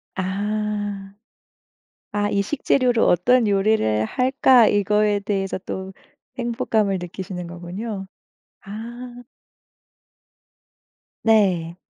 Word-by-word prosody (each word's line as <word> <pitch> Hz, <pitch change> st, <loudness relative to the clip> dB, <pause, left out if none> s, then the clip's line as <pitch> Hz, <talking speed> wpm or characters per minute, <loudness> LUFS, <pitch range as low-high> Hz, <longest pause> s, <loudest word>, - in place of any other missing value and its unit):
아. 205 Hz, +1 st, -3 dB, 1.0 s
아 205 Hz, 0 st, 0 dB
이 200 Hz, -, +1 dB
식재료로 250 Hz, -1 st, +1 dB
어떤 235 Hz, +7 st, +3 dB
요리를 195 Hz, -, +2 dB
할까? 255 Hz, -, +4 dB
이거에 210 Hz, 0 st, +2 dB
대해서 195 Hz, -2 st, -2 dB
또 190 Hz, 0 st, -5 dB, 0.5 s
행복감을 225 Hz, -5 st, 0 dB
느끼시는 180 Hz, 0 st, -6 dB
거군요. 190 Hz, +4 st, -6 dB, 0.6 s
아. 240 Hz, +4 st, -8 dB, 2.0 s
네. 185 Hz, -7 st, +2 dB
205 Hz, 170 characters per minute, -22 LUFS, 190-225 Hz, 2.0 s, 할까